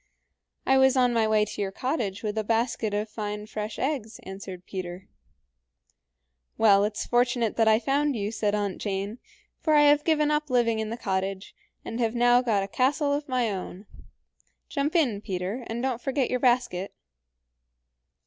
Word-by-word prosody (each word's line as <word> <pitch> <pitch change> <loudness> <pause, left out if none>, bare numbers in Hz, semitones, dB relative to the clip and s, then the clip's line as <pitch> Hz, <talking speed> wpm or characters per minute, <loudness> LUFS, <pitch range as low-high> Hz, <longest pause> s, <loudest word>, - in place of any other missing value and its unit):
"I 265 0 +4
was 265 0 +4
on 250 -1 +3
my 225 -2 +2
way 215 -1 +3
to 210 - -6
your 195 -1 -2
cottage 230 -4 -3
with 210 -1 -2
a 220 - -1
basket 225 0 0
of 210 +1 -1
fine 210 -1 -5
fresh 215 0 -5
eggs," 260 -6 -2
answered 190 -1 -8
Peter. 185 0 -6 1.5
"Well, 200 -3 +5
it's 210 0 -3
fortunate 240 -2 +1
I 220 -1 +5
found 275 +4 0
you," 205 -1 -2
said 210 -2 0
Aunt 205 -2 -2
Jane, 200 +3 -3 0.4
"for 310 -2 +2
I 295 - +7
have 295 0 +5
given 300 -2 +2
up 300 0 0
living 235 -3 +2
in 220 -1 -2
the 230 - -4
cottage, 195 -2 -3 0.3
and 225 - -5
have 230 -1 0
now 245 +1 +5
got 220 -6 +1
a - - -4
castle 285 +6 +1
of 290 0 -3
my 250 -4 +1
own. 190 +1 -6 0.8
Jump 290 +2 -1
in, 245 -12 +2
Peter, 195 +4 -4
and 235 +2 -4
don't 255 -3 -1
forget 270 -1 -1
your 250 - 0
basket." 240 -7 +1
225 Hz, 170 wpm, -26 LUFS, 205-255 Hz, 1.5 s, I